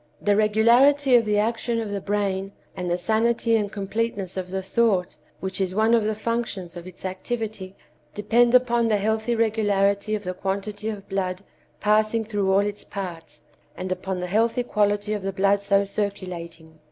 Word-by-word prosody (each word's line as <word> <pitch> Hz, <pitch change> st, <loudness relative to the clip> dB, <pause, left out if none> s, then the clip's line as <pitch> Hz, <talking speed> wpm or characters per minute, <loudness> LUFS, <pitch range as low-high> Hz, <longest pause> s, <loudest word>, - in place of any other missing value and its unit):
The 205 Hz, -1 st, +2 dB
regularity 240 Hz, +6 st, +4 dB
of 235 Hz, -2 st, +6 dB
the 210 Hz, -1 st, +1 dB
action 230 Hz, +2 st, 0 dB
of 220 Hz, -2 st, -4 dB
the 200 Hz, -1 st, -3 dB
brain 195 Hz, -1 st, -2 dB, 0.2 s
and 180 Hz, -2 st, -3 dB
the 175 Hz, -, +1 dB
sanity 225 Hz, +4 st, +1 dB
and 205 Hz, -2 st, 0 dB
completeness 200 Hz, -2 st, -3 dB
of 185 Hz, -1 st, -4 dB
the 190 Hz, +1 st, -3 dB
thought 190 Hz, -5 st, +1 dB, 0.3 s
which 190 Hz, +1 st, -2 dB
is 185 Hz, -1 st, -1 dB
one 220 Hz, +2 st, +3 dB
of 230 Hz, -2 st, +4 dB
the 215 Hz, 0 st, 0 dB
functions 220 Hz, -6 st, -3 dB
of 175 Hz, +1 st, -8 dB
its 185 Hz, +1 st, -11 dB
activity 200 Hz, 0 st, -4 dB, 0.4 s
depend 235 Hz, +4 st, +3 dB
upon 240 Hz, -2 st, +3 dB
the 215 Hz, -2 st, +2 dB
healthy 220 Hz, +3 st, 0 dB
regularity 210 Hz, -2 st, +1 dB
of 210 Hz, -, -5 dB
the 185 Hz, -, -3 dB
quantity 200 Hz, +3 st, -3 dB
of 205 Hz, -3 st, -7 dB
blood 185 Hz, -1 st, -2 dB, 0.4 s
passing 215 Hz, +2 st, +2 dB
through 205 Hz, -3 st, 0 dB
all 195 Hz, +1 st, +4 dB
its 205 Hz, 0 st, -4 dB
parts, 180 Hz, -5 st, -8 dB, 0.3 s
and 185 Hz, 0 st, -4 dB
upon 185 Hz, 0 st, -3 dB
the 180 Hz, -, -3 dB
healthy 225 Hz, +6 st, +1 dB
quality 205 Hz, -2 st, 0 dB
of 210 Hz, -, -3 dB
the 195 Hz, +1 st, -2 dB
blood 200 Hz, +1 st, +2 dB
so 200 Hz, 0 st, +2 dB
circulating. 175 Hz, -6 st, -5 dB
205 Hz, 175 wpm, -24 LUFS, 190-220 Hz, 0.4 s, of